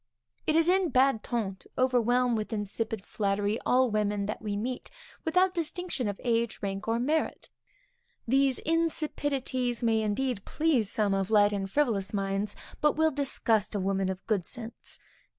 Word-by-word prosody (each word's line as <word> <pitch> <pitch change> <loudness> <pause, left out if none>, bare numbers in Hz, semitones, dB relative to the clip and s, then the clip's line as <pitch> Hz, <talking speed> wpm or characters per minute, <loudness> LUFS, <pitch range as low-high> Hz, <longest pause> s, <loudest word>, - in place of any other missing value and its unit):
It 310 - +3
is 330 0 +4
in 370 -1 +3
bad 260 -4 +3
ton 210 -6 -2
to - - -20
overwhelm 250 -1 +3
with 215 -1 -3
insipid 215 0 -3
flattery 205 +1 0
all 255 -1 +4
women 205 -1 0
that 210 - -4
we 205 -2 -2
meet, 245 +4 -4 0.3
without 365 +3 +3
distinction 340 - -2
of 200 -1 -4
age, 235 -2 +1
rank 195 +1 -3
or 225 +1 +2
merit. 305 +6 -1 0.8
These 270 +1 +3
insipidities 290 -7 -1
may 225 -1 +3
indeed 215 +1 -1
please 295 -10 +1
some 205 -2 +1
of 195 0 0
light 205 -1 +5
and 195 -1 -2
frivolous 210 -6 0
minds, 195 +1 -1 0.3
but 300 -1 +4
will 315 +1 +3
disgust 235 -7 +1
a - - +1
woman 195 0 0
of 190 0 -5
good 210 -5 +1
sense. 230 +4 -5
230 Hz, 160 wpm, -29 LUFS, 205-270 Hz, 0.8 s, light